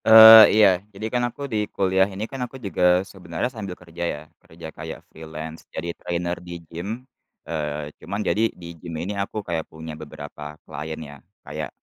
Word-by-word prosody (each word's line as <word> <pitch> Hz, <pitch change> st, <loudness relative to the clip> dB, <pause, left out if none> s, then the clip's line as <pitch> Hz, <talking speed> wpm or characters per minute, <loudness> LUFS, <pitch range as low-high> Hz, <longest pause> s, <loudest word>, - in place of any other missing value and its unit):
Eee, 110 Hz, 0 st, +12 dB
iya. 105 Hz, -2 st, +8 dB, 0.3 s
Jadi 100 Hz, +3 st, -6 dB
kan 125 Hz, -, +2 dB
aku 140 Hz, +4 st, -7 dB
di 105 Hz, -1 st, 0 dB
kuliah 95 Hz, 0 st, +2 dB
ini 100 Hz, +2 st, -4 dB
kan, 135 Hz, +2 st, -7 dB
aku 130 Hz, -, -10 dB
juga 90 Hz, -5 st, +2 dB
sebenarnya 90 Hz, +2 st, -4 dB
sambil 100 Hz, -6 st, -6 dB
kerja 85 Hz, -1 st, -11 dB
ya. 75 Hz, -, -4 dB, 0.2 s
Kerja 80 Hz, 0 st, -11 dB
kayak -, -, -8 dB
freelance, 80 Hz, 0 st, -8 dB
jadi 85 Hz, +1 st, -4 dB
trainer 85 Hz, 0 st, -3 dB
di 90 Hz, -1 st, -7 dB
gym. 100 Hz, +10 st, -6 dB, 0.4 s
Eee, 75 Hz, -2 st, -3 dB
cuman 100 Hz, +1 st, -4 dB
jadi, 110 Hz, +4 st, +2 dB
di 85 Hz, -, -12 dB
gym 85 Hz, -2 st, -6 dB
ini 95 Hz, +6 st, -3 dB
aku 100 Hz, +1 st, -3 dB
kayak 80 Hz, -2 st, -3 dB
punya 80 Hz, 0 st, -8 dB
beberapa 75 Hz, -1 st, -9 dB
klien, 80 Hz, +1 st, -6 dB
ya. 70 Hz, 0 st, -11 dB, 0.3 s
Kayak, -, -, -5 dB
90 Hz, 180 wpm, -24 LUFS, 80-105 Hz, 0.4 s, Eee